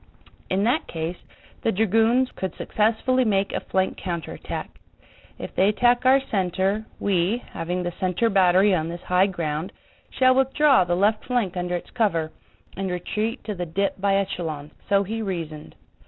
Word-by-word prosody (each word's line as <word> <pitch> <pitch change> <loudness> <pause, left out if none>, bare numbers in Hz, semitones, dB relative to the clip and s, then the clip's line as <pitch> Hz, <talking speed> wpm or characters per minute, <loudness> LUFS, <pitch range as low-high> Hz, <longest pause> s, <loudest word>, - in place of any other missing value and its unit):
In 190 +2 +1
that 250 +8 +1
case 165 +2 -4 0.4
the 225 - +1
dragoons 225 +5 +2
could 190 -3 -4
successfully 230 +4 +1
make 200 -3 +1
a - - 0
flank 190 0 -1
counterattack. 170 -4 -5 0.7
If - - -7
they 190 +2 +3
attack 245 +3 +3
our 265 +1 +6
center 195 +2 0
we, 200 +4 +1
having 180 +1 -3
the 175 - -2
center 185 +5 +1
battery 190 -1 +4
on 165 -2 0
this 170 +1 -7
high 180 +2 +3
ground, 165 -2 -3 0.4
shall 255 0 +4
withdraw 270 -2 +4
the 175 0 0
left 210 +4 +1
flank 235 -8 -1
under 180 0 -2
its 175 - -6
cover, 170 -10 0 0.4
and 195 0 -3
retreat 215 +7 -3
to 210 0 -4
the 175 -2 -4
dip 195 +3 -1
by 200 0 +2
echelons." 165 -7 -3 0.2
So 200 0 +4
he 225 +3 -4
reasoned.... 165 -7 -5
195 Hz, 160 wpm, -24 LUFS, 175-220 Hz, 0.7 s, our